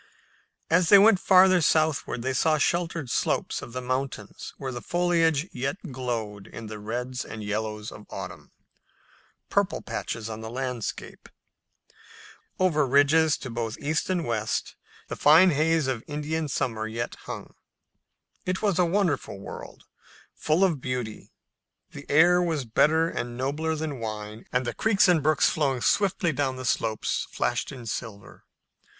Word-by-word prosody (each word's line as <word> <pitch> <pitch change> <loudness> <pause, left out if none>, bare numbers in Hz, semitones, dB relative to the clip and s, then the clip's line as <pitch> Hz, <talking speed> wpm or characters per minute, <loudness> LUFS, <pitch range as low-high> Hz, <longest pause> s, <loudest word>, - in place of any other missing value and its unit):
As 165 0 +4
they 200 - +10
went 205 -1 +6
farther 185 -1 +6
southward 155 -5 +1
they 130 +1 -1
saw 155 +4 +2
sheltered 165 -3 -1
slopes - - 0
of - - -9
the 130 +1 -5
mountains 130 -4 -4
where 135 -2 -4
the 120 -1 -6
foliage 170 -3 +1
yet 135 +6 -3
glowed 115 -6 -4
in 115 - -9
the 110 0 -7
reds 125 +4 -4
and 110 -1 -8
yellows 105 0 -3
of 105 - -12
autumn, - - -8 1.0
"purple - - +1
patches" 115 -2 -4
on 110 0 -6
the 110 - -6
landscape. 125 -2 -5 1.3
Over 155 -6 +2
ridges 145 +4 +4
to 130 - -6
both 115 -1 -3
east 150 +4 -1
and 180 -3 0
west 110 -2 -2 0.3
the - - -5
fine 165 +5 +6
haze 160 +1 +2
of 130 -4 -2
Indian 150 +1 -2
summer 115 -6 -2
yet 115 +2 -4
hung. - - -7 0.9
It 185 +3 -2
was 200 -4 +1
a 180 - +5
wonderful 170 - 0
world, 100 - -9 0.5
full 155 +5 +1
of 165 -8 +1
beauty. 125 -4 -4 0.6
The 145 0 -10
air 175 +4 +5
was 160 -6 -1
better 160 +8 +3
and 120 -6 -4
nobler 150 +5 -1
than 155 -4 -4
wine, 110 -1 -6
and 125 0 0
the 120 - -2
creeks 205 -4 +3
and 175 -3 +4
brooks 155 0 +3
flowing 135 -5 0
swiftly 190 - +2
down 135 -2 -1
the 130 0 -7
slopes 110 -2 -1
flashed - - -1
in 125 -4 -9
silver. 110 -2 -7
140 Hz, 150 wpm, -26 LUFS, 115-160 Hz, 1.3 s, they